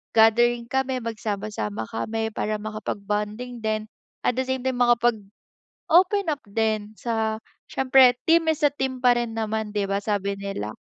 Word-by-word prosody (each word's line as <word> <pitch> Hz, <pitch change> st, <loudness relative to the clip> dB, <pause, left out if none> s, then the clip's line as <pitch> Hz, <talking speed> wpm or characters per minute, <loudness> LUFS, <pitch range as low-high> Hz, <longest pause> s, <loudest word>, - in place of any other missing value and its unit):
gathering 235 Hz, +2 st, +4 dB
kami, 265 Hz, -1 st, 0 dB
magsama-sama 205 Hz, -, -4 dB
kami, 220 Hz, -, -2 dB
para 215 Hz, 0 st, -1 dB
makapag-bonding 210 Hz, +3 st, -4 dB
din, 215 Hz, 0 st, -1 dB, 0.4 s
at 245 Hz, -, +2 dB
the 260 Hz, -, +2 dB
same 260 Hz, 0 st, -1 dB
time, 260 Hz, -1 st, 0 dB
makapag-open 240 Hz, -, +1 dB
up 290 Hz, -1 st, -4 dB
din 215 Hz, -1 st, 0 dB
sa 220 Hz, -2 st, -1 dB, 0.3 s
syempre, 260 Hz, -1 st, +5 dB, 0.2 s
"Team 330 Hz, -1 st, +5 dB
is 315 Hz, -, -3 dB
a -, -, +6 dB
team." 265 Hz, -2 st, -3 dB
pa 245 Hz, -1 st, +6 dB
rin 240 Hz, -1 st, -2 dB
naman 220 Hz, -1 st, -2 dB
di 205 Hz, -1 st, +1 dB
ba, 200 Hz, 0 st, +1 dB
sabi 200 Hz, -1 st, -1 dB
nila? 115 Hz, -, -5 dB
225 Hz, 150 wpm, -24 LUFS, 210-250 Hz, 0.4 s, a